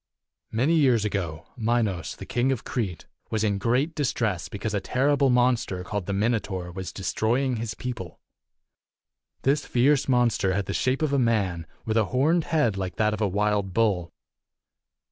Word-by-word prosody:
i. - - -8
Many 135 +9 +3
years 130 -9 +4
ago, 90 -7 -3
Minos, 110 -7 0
the - - -9
King 125 +2 +1
of 130 - -2
Crete, 95 -10 -3 0.2
was 110 -1 -1
in 100 -2 +1
great 125 - +1
distress 115 - -1
because 105 +1 -4
a 100 - 0
terrible 140 +5 +2
monster, 120 -7 +2
called 100 0 -4
the - - -1
Minotaur, 100 -4 -1
was 95 +1 -6
destroying 120 +6 0
his 115 0 -4
people. 120 -8 -6 1.2
This 145 +2 +2
fierce 135 +3 +2
monster 120 -6 +2
had 100 -1 -1
the - - -3
shape 130 +4 0
of 145 -2 +1
a 140 - +3
man, 100 -9 0 0.2
with 110 0 0
a 110 - +4
horned 150 - +2
head 135 - +1
like 95 -3 -3
that 105 0 +2
of 105 - -4
a 105 - +3
wild 100 -1 0
bull. 100 -7 +1
110 Hz, 170 wpm, -26 LUFS, 100-125 Hz, 1.2 s, years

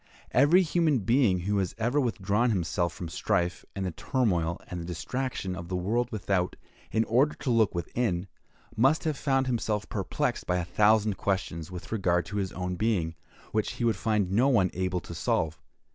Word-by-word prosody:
Every 150 +9 +5
human 160 -6 +2
being 115 -4 +3
who 100 +3 0
has 95 -3 -2
ever 120 +6 +1
withdrawn 110 -1 +1
himself 85 -4 0
from 85 - -7
the 80 - -7
strife, 90 -4 0
and 95 -1 -2
the 90 - -2
turmoil, 90 - 0
and 90 -1 -5
the - - -6
distraction, 95 - -3
of 85 -1 -7
the 90 - -3
world 115 +7 0
without, 95 -4 -1 0.4
in 110 - +2
order 130 +7 +2
to 130 - -2
look 110 -5 +3
within, 90 0 -1 0.5
must 135 +8 +3
have 155 -2 0
found 135 -1 +1
himself 110 -4 -1
perplexed - - -2
by 90 - +1
a 90 - -1
thousand 105 +1 +3
questions 90 -5 -2
with 90 -1 -8
regard 90 -5 +1
to 105 - -5
his 95 -2 -1
own 90 -1 -3
being, 95 -7 0 0.4
which 110 -1 0
he - - -4
would 115 -1 +3
find 105 -4 0
no 120 +7 +4
one 100 -9 +3
able 90 -1 -1
to - - -9
solve. 80 -1 -1
100 Hz, 190 wpm, -28 LUFS, 90-120 Hz, 0.5 s, Every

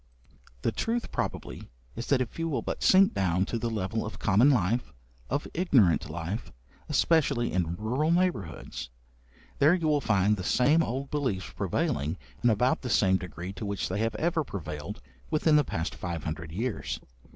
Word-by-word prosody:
The - - +2
truth, 230 - -2
probably, - - -4 0.3
is 120 - -5
that 140 -3 +3
if 125 +5 -4
you 165 0 0
will 145 - -1
but - - -4
sink 190 +1 +6
down 95 -1 +1
to 115 - -3
the 115 - -1
level 110 0 -2
of 110 -1 -6
common 105 +9 +4
life, 120 - +1 0.4
of 140 +2 -1
ignorant 100 - +3
life, 85 +8 -4 0.4
especially 150 -5 +2
in 85 -2 0
rural 125 - 0
neighbourhoods, 170 - -1 0.7
there 155 +5 +6
you 170 -3 -1
will 150 -2 +3
find 105 -2 +2
the 95 - -4
same 145 - +4
old 135 -1 -3
beliefs 125 -11 -1
prevailing, 75 +5 -1 0.3
in 120 - +5
about 125 +4 +2
the 125 - -4
same 95 -4 +4
degree 90 +1 -7
to 100 - -7
which 100 -1 -2
they 95 +3 -2
have 115 0 0
ever 160 +5 +1
prevailed, 75 - -6 0.3
within 155 0 +3
the 150 - +5
past 80 -10 -3
five 85 -4 -5
hundred 80 0 -5
years. 110 +6 -3
110 Hz, 175 wpm, -28 LUFS, 90-145 Hz, 0.7 s, sink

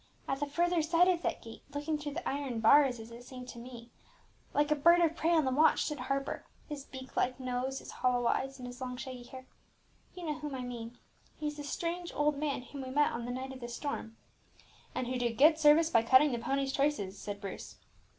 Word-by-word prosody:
At 270 - -1
the 290 - -1
further 345 +3 +2
side 335 +3 +4
of 355 -2 +2
that - - -2
gate, 225 0 -10
looking 295 +2 -1
through 290 -1 -5
the 345 - -4
iron 270 -4 -2
bars, 255 +2 +5
as 225 +1 -10
it 235 +1 -10
seemed 250 0 -9
to 235 - -8
me 240 -1 -10 0.6
like 295 +1 +1
a - - +5
bird 340 +4 +6
of 330 -2 +3
prey 330 - 0
on 325 -4 +4
the 260 - +1
watch, 305 +5 +4
stood 300 -1 -3
Harper, 275 0 -2 0.2
with 295 -2 -5
his 275 - -11
beak 260 -1 -10
like 255 +1 +1
nose, 255 +1 -2
his - - -8
hollow 245 -1 +1
eyes, 270 +3 0
and 250 - -8
his 245 +1 -9
long 250 -1 -4
shaggy 255 -1 -6
hair. 260 +1 -10 0.7
You 360 -2 -7
know 305 -1 -2
whom 295 -2 -5
I 255 - -4
mean, 240 -1 -6 0.4
he 305 - -4
is 295 0 -2
the 295 - -5
strange 340 +4 -3
old 295 0 +2
man 280 -3 -2
whom 275 +2 -8
we 260 - -6
met 295 +3 +3
on 235 0 -4
the 245 - -3
night 260 +1 -5
of 260 - -9
the 240 - -6
storm." 240 -3 -5 0.8
"And 255 - -1
who 250 +1 -2
did 235 -2 -1
good 310 +3 +6
service 315 +2 +6
by 230 - +5
cutting 260 +5 +6
the 240 - -1
pony's 270 +3 -1
traces," 275 -10 0
said 205 -1 -5
Bruce. 200 -2 -7
270 Hz, 240 wpm, -32 LUFS, 245-300 Hz, 0.8 s, bird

